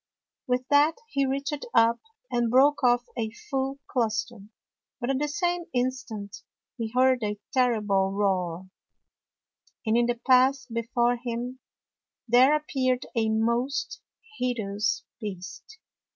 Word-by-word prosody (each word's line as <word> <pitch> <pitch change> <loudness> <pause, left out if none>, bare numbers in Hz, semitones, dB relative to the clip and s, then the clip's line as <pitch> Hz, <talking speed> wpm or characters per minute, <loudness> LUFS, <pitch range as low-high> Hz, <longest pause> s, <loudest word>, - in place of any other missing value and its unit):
With 250 0 0
that 290 +3 +5
he 275 -6 +1
reached 275 +2 -2
up 230 +1 +5 0.3
and 240 -1 +1
broke 275 +4 +4
off 245 -1 +4
a 225 -3 -2 0.2
full 270 0 -1
cluster, 230 -1 -1 0.6
but 250 +1 -1
at 265 - 0
the 295 - 0
same 345 +4 -1
instant 245 -5 -3 0.4
he 230 -3 -4
heard 255 0 +4
a 210 -1 -2 0.2
terrible 210 -7 +2
roar, 185 -3 -1 1.2
and 220 0 +2
in 240 0 +3
the 240 -1 -1
path 260 0 +5
before 240 +1 +1
him 245 +1 -5 0.7
there 255 +5 +6
appeared 260 -4 0
a 225 -2 +1
most 235 +5 -1 0.4
hideous 215 -5 -1 0.2
Beast. 205 - -8
245 Hz, 125 wpm, -27 LUFS, 225-265 Hz, 1.2 s, there